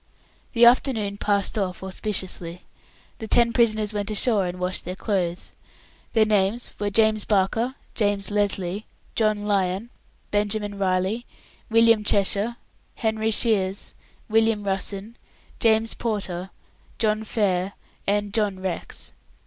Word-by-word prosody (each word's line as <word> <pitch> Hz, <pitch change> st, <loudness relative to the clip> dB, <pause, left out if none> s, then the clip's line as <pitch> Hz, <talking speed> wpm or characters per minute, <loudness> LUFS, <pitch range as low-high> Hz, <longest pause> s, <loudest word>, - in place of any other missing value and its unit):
The 235 Hz, -1 st, +6 dB
afternoon 230 Hz, -5 st, +3 dB
passed 205 Hz, +1 st, 0 dB
off 185 Hz, -1 st, -3 dB
auspiciously. 185 Hz, -3 st, -3 dB, 0.6 s
The 220 Hz, -, -5 dB
ten 235 Hz, +1 st, +3 dB
prisoners 215 Hz, -3 st, +2 dB
went 205 Hz, 0 st, -2 dB
ashore 210 Hz, -2 st, +2 dB
and 175 Hz, +1 st, -5 dB
washed 180 Hz, +1 st, -1 dB
their 180 Hz, -, -5 dB
clothes. 185 Hz, -4 st, -2 dB, 0.6 s
Their 220 Hz, -2 st, +5 dB
names 210 Hz, +2 st, +1 dB
were 205 Hz, 0 st, 0 dB
James 215 Hz, 0 st, +3 dB
Barker, 220 Hz, +5 st, +1 dB, 0.2 s
James 205 Hz, -2 st, 0 dB
Lesly, 200 Hz, -1 st, 0 dB, 0.3 s
John 215 Hz, -2 st, +1 dB
Lyon, 200 Hz, +2 st, 0 dB, 0.4 s
Benjamin 205 Hz, 0 st, 0 dB
Riley, 190 Hz, +5 st, 0 dB, 0.4 s
William 230 Hz, -1 st, +5 dB
Cheshire, 205 Hz, +3 st, +2 dB, 0.4 s
Henry 220 Hz, -1 st, 0 dB
Shiers, 205 Hz, -4 st, 0 dB, 0.3 s
William 225 Hz, -1 st, +2 dB
Russen, 200 Hz, +3 st, -3 dB, 0.4 s
James 225 Hz, 0 st, +3 dB
Porter, 195 Hz, -5 st, -3 dB, 0.5 s
John 215 Hz, -1 st, +1 dB
Fair, 195 Hz, -3 st, 0 dB, 0.3 s
and 205 Hz, 0 st, 0 dB
John 210 Hz, -4 st, +1 dB
Rex. 185 Hz, -2 st, -4 dB
205 Hz, 115 wpm, -24 LUFS, 195-220 Hz, 0.6 s, The